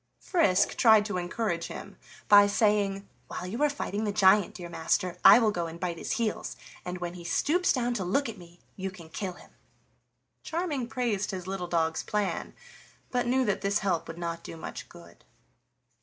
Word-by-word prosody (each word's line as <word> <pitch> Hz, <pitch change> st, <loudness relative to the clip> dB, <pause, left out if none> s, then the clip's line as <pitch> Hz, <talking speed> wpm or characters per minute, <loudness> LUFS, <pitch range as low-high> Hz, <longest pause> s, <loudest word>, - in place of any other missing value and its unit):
Frisk 200 Hz, -, +2 dB
tried 220 Hz, -3 st, +6 dB
to 195 Hz, -4 st, -2 dB
encourage 175 Hz, -1 st, -2 dB
him -, -, -9 dB, 0.3 s
by 205 Hz, 0 st, +8 dB
saying: 205 Hz, -1 st, +1 dB, 0.2 s
"While -, -, -6 dB
you 215 Hz, +9 st, -4 dB
are 295 Hz, -, +4 dB
fighting 220 Hz, -7 st, -3 dB
the 210 Hz, -, 0 dB
giant, 200 Hz, -1 st, +4 dB
dear 175 Hz, -2 st, -7 dB
master, 170 Hz, +1 st, -1 dB
I -, -, +10 dB
will 225 Hz, -3 st, +3 dB
go 175 Hz, -4 st, -2 dB
and 165 Hz, +1 st, -9 dB
bite 170 Hz, -2 st, -3 dB
his -, -, -3 dB
heels, 225 Hz, -3 st, -2 dB, 0.3 s
and 180 Hz, 0 st, -5 dB
when 175 Hz, -1 st, -5 dB
he 175 Hz, -1 st, -10 dB
stoops 340 Hz, -, +1 dB
down 245 Hz, -2 st, 0 dB
to 210 Hz, -5 st, -2 dB
look 225 Hz, +11 st, 0 dB
at 220 Hz, -3 st, -7 dB
me 175 Hz, 0 st, -15 dB, 0.2 s
you 190 Hz, 0 st, -4 dB
can 175 Hz, -4 st, -13 dB
kill 185 Hz, +3 st, -4 dB
him." -, -, -17 dB, 0.9 s
Charming 320 Hz, -7 st, -2 dB
praised 235 Hz, -6 st, -1 dB
his 185 Hz, -3 st, -5 dB
little 190 Hz, -1 st, -4 dB
dog's 165 Hz, -2 st, 0 dB
plan, 210 Hz, -2 st, -2 dB, 0.6 s
but 245 Hz, -1 st, 0 dB
knew 260 Hz, +1 st, +2 dB
that 205 Hz, -, 0 dB
this 200 Hz, +1 st, +1 dB
help 180 Hz, -4 st, 0 dB
would 165 Hz, -, -8 dB
not 170 Hz, -1 st, -4 dB
do 165 Hz, -, -8 dB
much -, -, -8 dB
good. 170 Hz, -1 st, -16 dB
195 Hz, 190 wpm, -28 LUFS, 175-225 Hz, 0.9 s, I